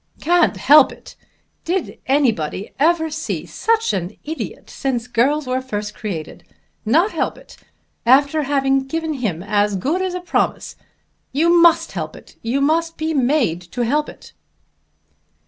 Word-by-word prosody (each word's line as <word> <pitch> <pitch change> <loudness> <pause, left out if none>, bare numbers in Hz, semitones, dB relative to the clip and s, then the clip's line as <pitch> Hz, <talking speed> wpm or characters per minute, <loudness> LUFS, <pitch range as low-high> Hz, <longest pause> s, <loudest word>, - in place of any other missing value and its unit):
"Can't 345 +1 +2
help 295 -1 +6
it! - - -14 0.5
Did 355 +1 -3
anybody 225 - 0
ever 320 +1 +2
see 315 +1 -4
such 455 - 0
an 185 +1 -4
idiot 315 +2 -6
since 250 -4 -3
girls 265 +5 +1
were 255 0 -1
first 210 -5 -5
created? 170 -7 -6 0.4
Not 330 - +3
help - - -2
it, - - -15 0.5
after 280 +5 +4
having 270 -1 +1
given 320 +2 -2
him 205 - -3
as 205 0 +1
good 290 - -1
as 375 -1 -2
a - - -2
promise! 355 - -1 0.6
You 335 +5 +3
must 335 -1 +4
help - - -5
it. - - -15
You 245 +5 -1
must 330 +3 +1
be 315 +1 -2
made 255 - +1
to 245 - -2
help 295 +5 0
it." - - -14
275 Hz, 145 wpm, -20 LUFS, 230-320 Hz, 0.6 s, help